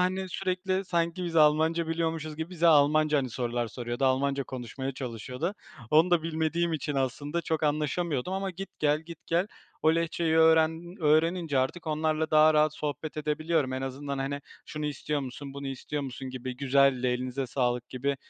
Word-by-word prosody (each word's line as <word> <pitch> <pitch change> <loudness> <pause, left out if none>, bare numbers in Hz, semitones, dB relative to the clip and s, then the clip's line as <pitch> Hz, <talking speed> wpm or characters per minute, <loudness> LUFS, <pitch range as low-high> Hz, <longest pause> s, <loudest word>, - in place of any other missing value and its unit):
hani, 185 +1 0
sürekli 185 +1 -1
sanki 170 0 -1
biz 170 -1 -3
Almanca 160 +2 +4
biliyormuşuz 160 -2 -2
gibi 160 +2 -5
bize 170 -2 +1
Almanca, 150 -1 +5
hani, 130 -3 -2
sorular 120 0 -2
soruyordu, 120 +3 -3
Almanca 135 +1 +1
konuşmaya 130 +2 -5
çalışıyordu. 125 - -4 0.4
Onu 160 +4 +5
da 175 -2 +4
bilmediğim 165 +1 0
için 150 -2 -2
aslında 145 +5 -1
çok 160 -2 -1
anlaşamıyordum 150 +1 0
ama 195 0 -2
git, 195 +2 -7
gel, 150 0 +2
git, 165 0 -12
gel 170 +3 +1 0.4
o 160 +1 +5
Lehçeyi 165 -1 0
öğren 160 +2 +4
öğrenince 160 0 +2
artık 130 +7 -1
onlarla 155 0 0
daha 155 0 +6
rahat 155 0 +3
sohbet 150 +1 -4
edebiliyorum. 155 -2 0
En 130 0 -3
azından, 135 +1 -4
hani, 140 +1 -2 0.3
"Şunu 150 0 -4
istiyor 150 +1 -2
musun, 135 +1 -7
bunu 140 0 -6
istiyor 135 +2 -4
musun?" 130 0 -6
gibi, 130 0 -6
"Güzeldi, 135 -1 +3
elinize 125 +2 -1
sağlık." 125 -1 -1
gibi. 140 +2 -2
150 Hz, 165 wpm, -28 LUFS, 135-165 Hz, 0.4 s, daha